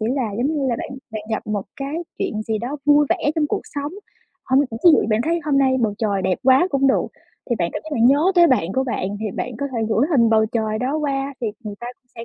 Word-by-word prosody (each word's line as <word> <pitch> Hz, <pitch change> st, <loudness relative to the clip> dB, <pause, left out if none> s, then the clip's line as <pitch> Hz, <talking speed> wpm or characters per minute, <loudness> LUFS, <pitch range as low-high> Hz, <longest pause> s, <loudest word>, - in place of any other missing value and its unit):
chỉ 215 Hz, -, -1 dB
là 245 Hz, -6 st, -1 dB
giống 245 Hz, -, +1 dB
như 275 Hz, -, 0 dB
là 235 Hz, -, 0 dB
bạn -, -, -5 dB, 0.2 s
bạn 215 Hz, -1 st, -4 dB
gặp 220 Hz, -, -2 dB
một 210 Hz, -2 st, -2 dB
cái 275 Hz, +3 st, -4 dB, 0.2 s
chuyện 215 Hz, -1 st, -2 dB
gì 220 Hz, -1 st, -2 dB
đó 245 Hz, +7 st, -4 dB
vui 295 Hz, 0 st, +5 dB
vẻ 295 Hz, -, +1 dB
trong 310 Hz, -2 st, +1 dB
cuộc -, -, -2 dB
sống. 285 Hz, +1 st, -5 dB, 0.5 s
Hôm 260 Hz, +1 st, +3 dB
ví 290 Hz, -, +1 dB, 0.3 s
dụ -, -, +5 dB
như -, -, -1 dB
bạn 215 Hz, +1 st, +2 dB
thấy 335 Hz, +2 st, 0 dB
hôm 290 Hz, -3 st, +2 dB
nay 265 Hz, -1 st, +3 dB
bầu 215 Hz, -3 st, 0 dB
trời 200 Hz, -3 st, 0 dB
đẹp 185 Hz, 0 st, 0 dB
quá 265 Hz, +6 st, +5 dB
cũng 275 Hz, -1 st, +2 dB
được, 270 Hz, -, +2 dB, 0.4 s
thì 235 Hz, -, +2 dB
bạn 170 Hz, -3 st, -1 dB
cảm -, -, -4 dB
giác 315 Hz, -, -8 dB
bạn 235 Hz, -4 st, +3 dB
nhớ 295 Hz, +8 st, +4 dB
tới 345 Hz, -1 st, +7 dB
bạn 195 Hz, -, +1 dB
của 265 Hz, -, +1 dB
bạn 240 Hz, -7 st, -2 dB
thì 215 Hz, -1 st, -2 dB
bạn 240 Hz, +4 st, -5 dB
có 280 Hz, -, -1 dB
thể 240 Hz, -, -2 dB
gửi 225 Hz, +5 st, +2 dB
hình 235 Hz, -7 st, +4 dB
bầu 220 Hz, -1 st, +4 dB
trời 220 Hz, -1 st, -2 dB
đó 260 Hz, +5 st, -1 dB
qua, 280 Hz, -2 st, -2 dB
thì 240 Hz, -, -1 dB, 0.2 s
người 210 Hz, -1 st, -5 dB
ta 240 Hz, -, -6 dB
cũng 250 Hz, -, -48 dB
sẽ, 230 Hz, -, -7 dB
255 Hz, 280 wpm, -21 LUFS, 220-280 Hz, 0.5 s, tới